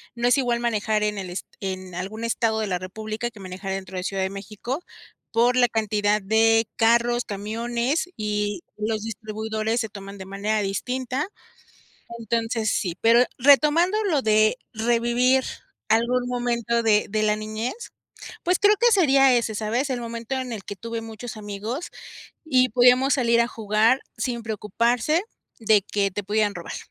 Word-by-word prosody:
no 240 +1 0
es 245 +3 +4
igual 240 -2 0
manejar 215 -2 0
en 210 -1 -1
el 185 -2 -6
es 180 - -5
en 185 -2 -5
algún 200 +6 -5
estado 225 -1 0
de 215 - -1
la 180 -3 -2
república 215 +5 -5
que 215 - -16
manejar 190 +1 -7
dentro 190 -1 -6
de 180 - -3
Ciudad 195 -1 -2
de 190 - -2
México, 215 - -6 0.5
por 240 +2 +3
la 245 -1 +5
cantidad 210 -1 +1
de 225 +2 +3
carros, 235 +1 +3
camiones 235 - -2
y 210 +6 -2
los 215 0 -2
distribuidores 220 +1 -3
se 220 -3 -2
toman 200 0 -9
de 190 - -8
manera 205 +2 -1
distinta. 255 - -2 0.9
Entonces 225 -1 -1
sí, 180 -2 -2
pero 235 +2 +5
retomando 300 - +5
lo 315 -8 +2
de 215 +1 +3 0.2
revivir 240 +3 +2 0.5
algún 240 +3 +2
momento 235 -1 0
de 215 -2 +3
de 215 +1 -1
la 210 0 +3
niñez, 215 - -5 0.5
pues, 360 +1 +2
creo 410 +1 +5
que 480 0 +5
sería 275 - +5
ese, 225 -2 -1
¿sabes?, 225 +6 -1
el 250 -2 -2
momento 235 +2 -5
en 255 -2 -3
el 205 -3 -6
que 205 - -6
tuve 230 +3 -5
muchos 225 +1 -8
amigos 215 - -5 0.6
y 255 -4 +3
podíamos 250 +4 +5
salir 235 -2 +3
a 235 - +1
jugar, 220 +3 +2 0.2
sin 235 -3 -3
preocuparse 235 - 0 0.4
de 215 -2 +4
que 200 0 -1
te 205 +2 -4
pudieran 210 0 +1
robar. 175 -1 -7
225 Hz, 165 wpm, -24 LUFS, 210-245 Hz, 0.9 s, la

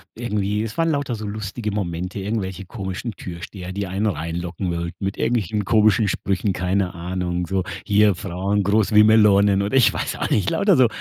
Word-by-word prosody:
irgendwie 105 -2 -1
es 110 -1 -6
waren 165 0 +2
lauter 140 -5 -1
so 110 -1 -6
lustige 105 +1 -4
Momente, 90 -1 -3
irgendwelche 95 -2 -3
komischen 95 +3 -5
Türsteher, 90 +1 -8
die 100 0 -3
einen 100 +4 -1
reinlocken 85 +1 -3
wollten, 85 +3 -4
mit 95 - -3
irgendwelchen 105 -3 0
komischen 110 0 +4
Sprüchen, 100 +1 -1
keine 90 0 -1
Ahnung. 90 0 -3
So, 95 -1 0 0.2
hier 105 -1 +4
Frauen 100 +2 -1
groß 105 +2 +2
wie 105 0 +8
Melonen 105 -2 +5
oder 100 +7 +1
ich 125 - +5
weiß - - -3
auch - - -2
nicht 100 -2 +2
lauter 200 -2 +3
so 130 -2 +6
100 Hz, 180 wpm, -22 LUFS, 90-105 Hz, 0.2 s, wie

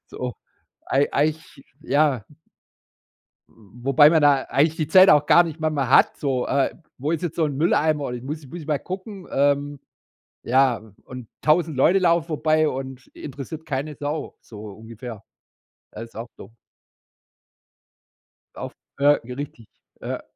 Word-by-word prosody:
So, 125 -1 -6 0.5
ei 140 +2 +2
eigentlich, 150 -1 -2 0.2
ja 140 -6 +1 1.3
Wobei 125 +7 +2
man 160 -2 +3
da 140 -2 +4
eigentlich 155 +3 +2
die 155 -3 -1
Zeit 190 0 +7
auch 150 0 +5
gar 175 +3 +6
nicht 160 -1 -7
manchmal 150 -5 -1
hat, - - +4
so, 130 -4 -1
äh, 140 -1 +1 0.2
wo 145 +4 -2
ist 165 - -1
jetzt 165 -2 -3
so 160 - +1
'n 140 -2 -3
Mülleimer? 155 -3 +1
Ich 120 - -6
muss 150 +1 -6
muss 170 +6 -8
ich 155 - -12
mal 150 -2 0
gucken, 190 0 -8
ähm, 145 0 +1 0.6
ja, 130 -2 +2 0.2
und 125 -3 -9
1.000 155 -2 +2
Leute 185 +8 +4
laufen 170 -2 +2
vorbei 155 0 +1
und 135 -1 -6
interessiert 150 +3 -8
keine 145 +2 -4
Sau, 150 +2 -5
so 105 -3 -13
ungefähr. 110 +1 -10 0.7
Das 115 +2 -8
ist 115 - -21
auch 115 +2 -6
dumm. 115 - -13 2.0
Auf - - -7 0.2
äh, 140 - -1 0.2
richtig, 125 -3 -8 0.3
ja. - - -4
145 Hz, 145 wpm, -23 LUFS, 130-155 Hz, 2.0 s, Zeit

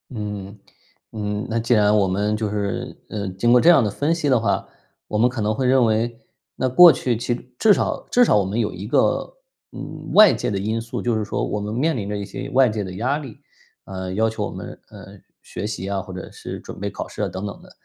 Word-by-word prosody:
嗯， 105 -1 -6 0.5
嗯。 105 -1 -3
那 115 +1 0
既 120 +2 +1
然 105 -1 +4
我 100 -2 +3
们 105 +3 0
就 105 -1 -2
是 100 -1 -3
呃， 100 -2 -4
经 95 +6 +1
过 125 0 +6
这 170 - +6
样 165 -7 +6
的 105 - 0
分 145 +9 0
析 165 -3 -1
的 130 -3 +4
话， 110 - -1 0.4
我 105 - -2
们 120 +3 +4
可 125 -3 -4
能 105 +1 +1
会 130 +3 -1
认 130 -1 +4
为， 115 +2 0 0.4
那 130 - 0
过 170 +7 +9
去 125 -5 -1
其 120 +2 -2 0.2
至 215 - +6
少 - - -2
至 245 0 +5
少 - - +3
我 100 - +3
们 100 +5 -2
有 110 - 0
一 95 +3 -7
个， 315 - +1 0.4
嗯， - - -8
外 210 -7 +8
界 110 - -2
的 100 - -2
因 110 +3 -2
素， 115 - -5
就 120 -2 0
是 110 - -1
说 105 - -3
我 105 - -3
们 105 +1 -4
面 155 +7 +1
临 100 -4 -4
着 105 - -2
一 100 - -4
些 130 +7 -7
外 130 -1 +5
界 105 -1 -3
的 95 -1 -7
压 125 +8 0
力， 135 -8 -10 0.5
呃， 95 -1 -5
要 110 +3 +2
求 110 - -3
我 - - -5
们， - - -8
呃， - - -12 0.4
学 105 - -5
习 105 -3 -5
啊， 100 -1 -2
或 95 - -11
者 90 - -8
是 - - -8
准 - - -10
备 - - -3
考 - - -6
试 - - -7
啊， - - +1
等 95 +3 -6
等 100 - -7
的。 - - -16
110 Hz, 270 characters per minute, -22 LUFS, 100-125 Hz, 0.5 s, 过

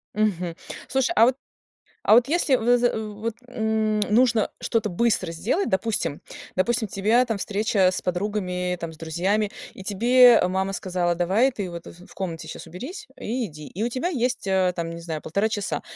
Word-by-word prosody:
Мгм. 180 -5 0 0.3
Слушай, 265 +4 +1
а 230 - +7
вот 250 +1 +2 0.7
а - - +6
вот 240 +1 +6
если 290 -3 +2
в 245 +2 +3
з 245 0 +3
вот 215 +1 -4
н 220 -3 0
нужно 230 -1 +3
что-то 225 -3 0
быстро 190 -2 +1
сделать, 220 - -1
допустим. 190 -6 -1 0.4
Допустим, 225 +3 +1
тебя 215 +6 +2
там 225 -4 -2
встреча 200 -2 +2
с - - -4
подругами, 180 -1 -2
там, 165 -1 -5
с - - -14
друзьями, 185 +7 -1 0.2
и 190 - -11
тебе 240 +5 +6
мама 190 +1 -1
сказала: 180 -2 -1
"Давай 195 +10 +2
ты 200 -6 -4
вот 170 -1 -8
в 175 +2 -13
в - - -16
комнате 165 -4 -5
щас - - -8
уберись 210 - -8
и 240 +2 -2
иди". 150 -4 -10
И 205 +5 -3
у - - +1
тебя 255 +8 -2
есть, 250 - -1
э, 190 -1 +2
там, 165 -1 -3
не 170 0 -7
знаю, 160 -2 -5
1,5 200 +7 0
часа. 205 -3 -2
210 Hz, 185 wpm, -24 LUFS, 180-235 Hz, 0.7 s, а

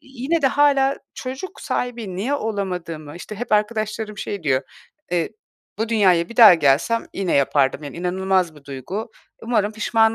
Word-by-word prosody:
yine 270 +5 -2
de - - +5
hâlâ 275 0 +3 0.2
çocuk 265 +9 -7
sahibi 235 -7 -3
niye 235 +10 -1
olamadığımı, 180 - -4
işte, 195 +4 -8
hep 245 +1 -5
arkadaşlarım 215 0 -1
şey 200 -4 -4
diyor, 135 -3 +1 0.5
eee, 175 -2 0 0.5
"Bu 225 +1 -1
dünyaya 185 -7 +3
bir 235 - -11
daha 220 -7 +10
gelsem 155 +10 +2
yine 190 -3 -1
yapardım, 140 0 +2
yani, 145 - -8
inanılmaz 180 -1 0
bir 145 - -17
duygu. 145 - -6 0.3
Umarım 220 -3 0
pişman 220 +1 +2
210 Hz, 155 wpm, -21 LUFS, 170-235 Hz, 0.5 s, daha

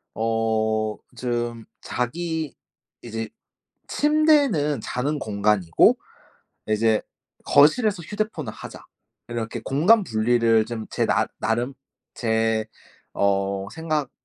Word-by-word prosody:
어 110 -1 0 0.2
좀 120 -2 -3 0.2
자기 160 +4 -3 0.5
'이제 115 -2 -5 0.6
침대는 290 - +3
자는 145 +4 -2
공간이고 100 - +3 0.7
이제 110 0 +2 0.4
거실에서 185 - +4
휴대폰을 195 - -4
하자.' - - -10 0.4
이렇게 115 -1 -4
공간 190 +10 +4
분리를 115 -1 +3
좀 115 -2 -5
제 - - 0
나 - - +2
나름 120 +5 -1 0.4
제 110 -1 0 0.5
어 100 0 0
생각 155 -3 -2
120 Hz, 185 characters per minute, -24 LUFS, 110-155 Hz, 0.7 s, 거실에서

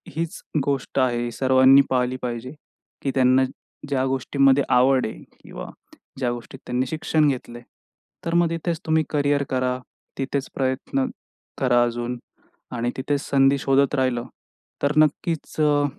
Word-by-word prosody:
हीच 165 0 -3 0.2
गोष्ट 140 -1 -1
आहे 120 -2 +1
सर्वांनी 130 +2 +6
पाहिली 125 0 +1
पाहिजे, 120 +1 -4 0.5
की 135 - -1
त्यांना 130 0 +4 0.5
ज्या 135 -2 +1
गोष्टीमध्ये 135 +1 +3
आवड 130 +1 +4
आहे - - -9 0.2
किंवा - - -8 0.5
ज्या 125 -2 0
गोष्टीत 120 +2 -8
त्यांनी 125 +1 -1
शिक्षण 155 0 +1
घेतलंय 120 -3 -3 0.6
तर 170 - -2
मग 170 -1 +4
तिथेच 165 0 -2
तुम्ही 160 0 +2
करियर 145 -1 +1
करा, 125 -1 0 0.4
तिथेच 135 0 -2
प्रयत्न 130 0 -1 0.5
करा 120 -2 +3
अजून 120 +1 -2 0.6
आणि 120 +1 -1
तिथेच 140 +1 -1
संधी 135 0 +4
शोधत 135 +2 +2
राहिलं 130 -3 0 0.6
तर 145 - +3
नक्कीच 155 +1 +1
अ, 145 -1 +3
135 Hz, 135 wpm, -23 LUFS, 125-145 Hz, 0.6 s, सर्वांनी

